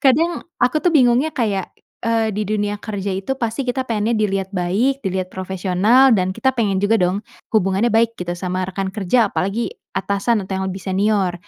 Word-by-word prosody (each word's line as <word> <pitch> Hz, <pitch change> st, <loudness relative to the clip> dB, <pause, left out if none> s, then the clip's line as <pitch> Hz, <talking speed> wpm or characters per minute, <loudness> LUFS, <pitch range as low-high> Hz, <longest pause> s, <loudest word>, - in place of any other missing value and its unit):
kadang 325 Hz, +6 st, +2 dB
aku 250 Hz, +5 st, +2 dB
tuh 360 Hz, -, +2 dB
bingungnya 250 Hz, +3 st, +4 dB
kayak, 205 Hz, -6 st, 0 dB, 0.3 s
eee, 225 Hz, -2 st, +1 dB
di 210 Hz, 0 st, -3 dB
dunia 205 Hz, -1 st, -1 dB
kerja 200 Hz, -2 st, -4 dB
itu 195 Hz, +8 st, -3 dB
pasti 245 Hz, +2 st, -3 dB
kita 260 Hz, +1 st, -1 dB
pengennya 225 Hz, -1 st, 0 dB
dilihat 195 Hz, -2 st, 0 dB
baik, 220 Hz, +10 st, 0 dB
dilihat 185 Hz, -1 st, -2 dB
profesional 190 Hz, +7 st, +2 dB
dan 185 Hz, 0 st, 0 dB
kita 265 Hz, +5 st, 0 dB
pengen 200 Hz, -4 st, +1 dB
juga 215 Hz, +3 st, +3 dB
dong 185 Hz, +2 st, +1 dB, 0.3 s
hubungannya 205 Hz, +2 st, +2 dB
baik 230 Hz, +1 st, +2 dB
gitu 175 Hz, -1 st, -4 dB
sama 185 Hz, +1 st, -3 dB
rekan 190 Hz, +1 st, -3 dB
kerja 205 Hz, +3 st, +1 dB
apalagi 200 Hz, +6 st, -1 dB, 0.2 s
atasan 200 Hz, +3 st, 0 dB
atau 190 Hz, -, -6 dB
yang 190 Hz, -, -2 dB
lebih 190 Hz, -, -5 dB
senior. 190 Hz, 0 st, +1 dB
205 Hz, 180 wpm, -20 LUFS, 190-235 Hz, 0.3 s, bingungnya